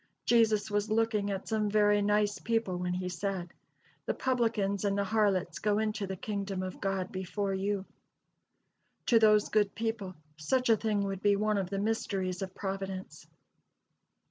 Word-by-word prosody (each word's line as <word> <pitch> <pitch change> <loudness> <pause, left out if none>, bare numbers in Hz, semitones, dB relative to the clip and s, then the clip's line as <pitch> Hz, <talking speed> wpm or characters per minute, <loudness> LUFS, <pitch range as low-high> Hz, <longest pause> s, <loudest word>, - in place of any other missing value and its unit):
Jesus 220 -3 +3
was 205 +1 0
looking 215 -2 +1
at 195 -1 -4
some 215 -2 0
very 205 0 +4
nice 205 0 +1
people 225 -5 0
when 180 0 -2
he 185 0 -3
said, 180 -1 -3 0.5
"The - - 0
publicans 225 -6 0
and 200 -1 +1
the 200 - +2
harlots 200 -5 +1
go 210 -1 +1
into 215 -2 -1
the 190 - -4
kingdom 195 -1 -3
of 185 -1 -6
God 195 -2 -1
before 195 +1 -2
you." 195 0 -1 1.2
To 230 - +5
those 215 -1 +5
good 210 -2 +2
people, 220 -4 -3 0.2
such 250 +12 0
a 225 - +7
thing 215 -1 0
would 195 -1 -3
be 205 -1 +4
one 210 0 +1
of 185 -2 -3
the 195 - -2
"mysteries 195 -3 -1
of 190 -1 -5
Providence." 190 -4 -5
205 Hz, 165 wpm, -31 LUFS, 190-215 Hz, 1.2 s, a